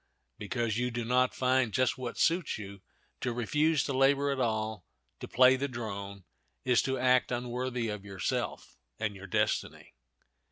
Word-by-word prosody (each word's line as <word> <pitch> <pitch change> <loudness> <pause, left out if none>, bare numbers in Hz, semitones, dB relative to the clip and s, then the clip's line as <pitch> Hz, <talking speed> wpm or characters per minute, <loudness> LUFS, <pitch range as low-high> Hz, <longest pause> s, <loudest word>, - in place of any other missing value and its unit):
Because 115 +1 -1
you 125 0 0
do 120 -1 -3
not 125 +1 +2
find 130 -2 +2
just 130 +2 +2
what 125 -2 -6
suits 170 0 +1
you, 100 -2 -9 0.4
to 125 - -1
refuse 150 +5 +1
to 140 - -2
labor 140 +2 +3
at 135 - -2
all, 110 -4 -1 0.4
to - - -7
play 130 +1 +6
the 140 +2 -2
drone, 100 -5 -6 0.4
is 125 -2 +4
to 130 0 -1
act 130 0 +3
unworthy 125 0 -2
of 105 -2 -5
yourself 100 -2 -3 0.2
and 105 -2 -2
your 95 0 -10
destiny. - - -1
125 Hz, 160 wpm, -30 LUFS, 110-130 Hz, 0.4 s, play